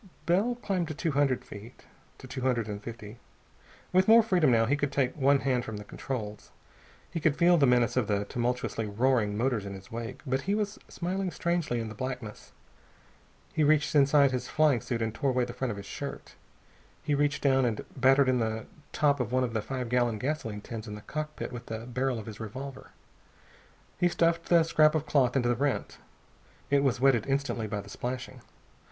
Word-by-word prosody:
Bell 200 +8 +2
climbed 195 -7 -2
to 155 - -5
two 165 +2 -1
hundred 140 -2 +1
feet. 110 +4 -12 0.3
To - - -12
two 130 0 -6
hundred 125 -4 0
and 105 -1 -5
fifty. 115 0 -9 0.7
With 185 +1 +4
more 225 +1 +8
freedom, 180 -9 +3
now, 115 -2 +4
he 135 +5 +2
could 145 -1 -1
take 130 -3 0
one 140 -1 +3
hand 125 -3 +1
from 110 -1 -6
the 105 - -7
controls. 105 -2 -6 0.6
He 165 - -2
could 155 -2 +1
feel 175 +1 +5
the 145 -5 +4
menace 120 -2 +3
of 125 -5 +1
the 100 -1 0
tumultuously 120 -1 -2
roaring 105 -1 +1
motors 120 -3 0
in 100 -1 -6
his 95 0 -13
wake, 115 0 -6
but 130 0 0
he 200 +7 0
was 210 0 -2
smiling 185 +2 -2
very - - -11
strangely 170 -8 0
in 115 - -3
the 110 - -7
blackness. 125 -4 -6 1.0
He 155 - +2
reached 150 +1 +3
inside 140 -1 +5
his 125 0 -3
flying 150 -6 +3
suit 115 -1 -2
and 110 -1 -2
tore 135 +5 0
away 125 -1 +1
the 120 - -7
front 125 +1 -2
of 105 - -4
his 100 - -8
shirt. - - -7 0.7
He 150 - 0
reached 145 0 +1
down 135 -2 +4
and 115 -3 -1
battered 135 +1 +4
in 130 -1 +2
the 110 -1 -2 0.3
top 145 -2 +2
of 120 -3 -2
one 130 0 +2
of 120 -2 -2
the 110 - 0
five 130 +2 -4
gallon 120 -2 +1
gasoline 115 -4 -3
tins 115 0 -7
in 105 - -6
the 105 - -9
cockpit 155 +5 -5
with 120 0 -8
the 115 +1 -5
barrel 125 +1 -1
of 110 - -7
his 110 -2 -9
revolver. 130 +5 -7 1.1
He 175 - +3
stuffed 170 -1 +1
the 170 -2 +6
scrap 155 -1 +4
of 155 -1 0
cloth 130 -4 +2
into 120 -3 +2
the - - +3
rent. 140 +2 -2 0.7
It 140 -1 +4
was 130 -4 +1
wetted 130 -4 +3
instantly 135 -5 -1
by 105 -1 -3
the 100 - -13
splashing. 125 +4 -5
130 Hz, 210 wpm, -29 LUFS, 115-145 Hz, 1.1 s, more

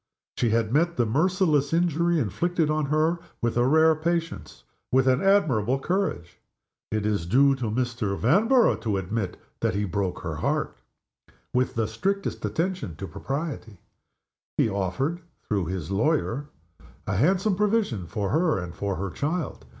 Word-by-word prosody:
She 120 - +1
had 115 0 +1
met 170 +2 +2
the 120 - +3
merciless 155 - +2
injury 170 0 +2
inflicted 155 - 0
on 155 -1 0
her 155 +4 +1 0.2
with 120 -1 -1
a 120 +1 +3
rare 160 +3 +5
patience, 165 +1 -3 0.3
with 130 0 +3
an 130 +1 +3
admirable 135 - +3
courage. 175 - -2 0.5
It 110 -1 -1
is 100 -6 0
due 135 +8 +5
to 125 - -3
Mr. 115 -3 -1
Vanborough 225 - +3
to 105 -4 0
admit 95 0 -3 0.2
that - - 0
he 105 +1 0
broke 95 -1 -2
her - - -4
heart, - - -1 0.8
with 125 0 +1
the 115 -2 0
strictest 195 - -2
attention 175 - -2
to 95 - -6
propriety. 135 - -5 0.8
He - - +3
offered 110 - -2 0.3
(through 100 -5 0
his 90 -1 -4
lawyer 140 +4 0 0.3
) - - -23
a - - -1
handsome 185 - +2
provision 200 - 0
for 100 0 -2
her 160 - +2
and 90 -2 -5
for 100 0 -2
her 95 0 -4
child. 155 +4 -3
135 Hz, 155 wpm, -26 LUFS, 105-170 Hz, 0.8 s, rare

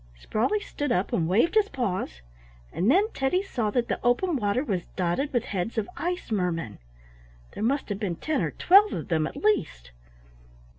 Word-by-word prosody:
Sprawley 245 - 0
stood 290 - -4
up 190 -4 0
and 165 -3 +1
waved 225 - +3
his 430 -1 +3
paws, 185 - -3 0.5
and 190 +6 +1
then 400 - +4
Teddy 320 +8 0
saw 235 - -2
that 235 +3 0
the - - -2
open 295 +9 +2
water 220 +1 0
was 190 - -2
dotted 185 +11 -1
with 240 -3 +1
heads 200 +4 -3
of 220 - 0
ice 355 -6 -3
mermen; 170 - -2 0.7
there - - -7
must 265 +5 0
have 200 -1 -3
been 195 -6 -2
ten 310 - -1
or - - 0
twelve 400 +4 +5
of - - -5
them 160 -2 +1
at - - -9
least. 150 - 0
230 Hz, 185 wpm, -26 LUFS, -, 0.7 s, twelve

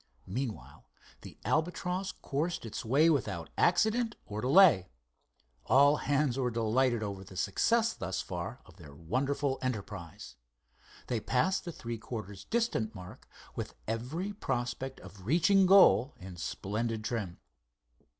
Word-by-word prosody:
Meanwhile 105 - -5 0.3
the - - -11
Albatross 180 - -1
coursed 155 +1 -3
its 115 +4 -5
way 140 +8 +4
without 110 - 0
accident 220 +6 +2
or 105 +1 -5
delay. 130 - +6 0.8
All 140 +2 +6
hands 140 -3 0
were 125 -2 +1
delighted 115 +1 +1
over 100 -2 -5
the 95 -1 -12
success 230 - +2
thus 95 0 -4
far 90 +8 -5
of 95 -1 -18
their 75 -6 -13
wonderful 130 - -1
enterprise. 100 -9 -5 0.7
They 120 - -1
passed 180 - 0
the 175 - -4
three 115 -6 -6
quarters 105 -5 -7
distance 225 - -1
mark 90 -2 -11 0.3
with - - -5
every 135 - -3
prospect 130 - -3
of 95 -1 -12
reaching 185 - +4
goal 180 - +6
in 95 -1 -9
splendid 110 +6 -3
trim. 105 -7 -3
125 Hz, 130 wpm, -31 LUFS, 105-160 Hz, 0.8 s, delay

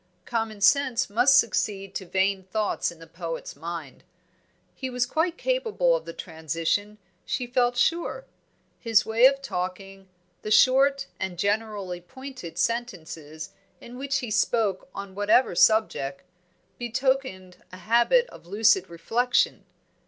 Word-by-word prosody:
common 225 -2 -3
sense 255 0 +3
must 250 +6 +5
succeed 195 -4 0
to 190 - -5
vain 190 +1 +1
thoughts 205 +1 -2
in 170 - -14
the 165 - -13
poet's 165 0 -6
mind. 165 -5 -7 0.7
He 260 - -5
was 250 -1 0
quite 325 +6 -1
capable - - +1
of - - -4
the - - -6
transition, 165 +5 -3 0.3
she 250 - -2
felt 245 0 +1
sure. 340 - 0 0.5
His 225 -3 +3
way 230 +3 +6
of 275 0 -1
talking, 195 -2 -5 0.3
the - - -5
short 270 +5 +4
and 190 -2 -4
generally 200 -2 -2
pointed 260 -5 -10
sentences 165 -8 -3 0.3
in 240 - -11
which 270 +1 -1
he 240 -3 -5
spoke 220 -4 0
on 200 -1 -7
whatever 205 +3 +3
subject, 175 -9 +2 0.6
betokened 240 -6 -1
a 185 - -9
habit 235 - +3
of - - -14
lucid 195 -2 +3
reflection. 235 +9 0
215 Hz, 130 wpm, -26 LUFS, 185-255 Hz, 0.7 s, way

